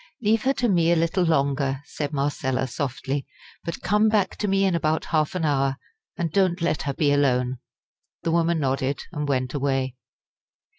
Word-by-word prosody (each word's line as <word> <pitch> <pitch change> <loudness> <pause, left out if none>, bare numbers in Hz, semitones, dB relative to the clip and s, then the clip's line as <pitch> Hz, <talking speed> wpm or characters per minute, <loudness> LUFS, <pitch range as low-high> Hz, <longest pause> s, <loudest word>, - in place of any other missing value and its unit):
"Leave 220 0 +2
her 270 - +4
to 250 -3 0
me 170 -5 +3
a - - +5
little 170 +3 +1
longer," 140 -4 +1
said 145 -1 -4
Marcella, 140 -2 -1
softly; 135 +1 -3 0.4
"but 170 0 -5
come 210 +4 +3
back 205 -3 +1
to 210 - -2
me 195 0 +2
in 190 - +2
about 160 -1 0
half 155 +2 +1
an 170 -3 0
hour, 135 -2 +1 0.4
and 170 -4 -1
don't 185 0 +2
let 165 -3 0
her 140 - -2
be 145 -2 +2
alone." 130 -3 +2 0.6
The 165 - 0
woman 170 0 +2
nodded, 135 0 -1
and 150 -4 -3
went 130 -2 0
away. 135 -2 -1
155 Hz, 180 wpm, -24 LUFS, 135-175 Hz, 0.6 s, a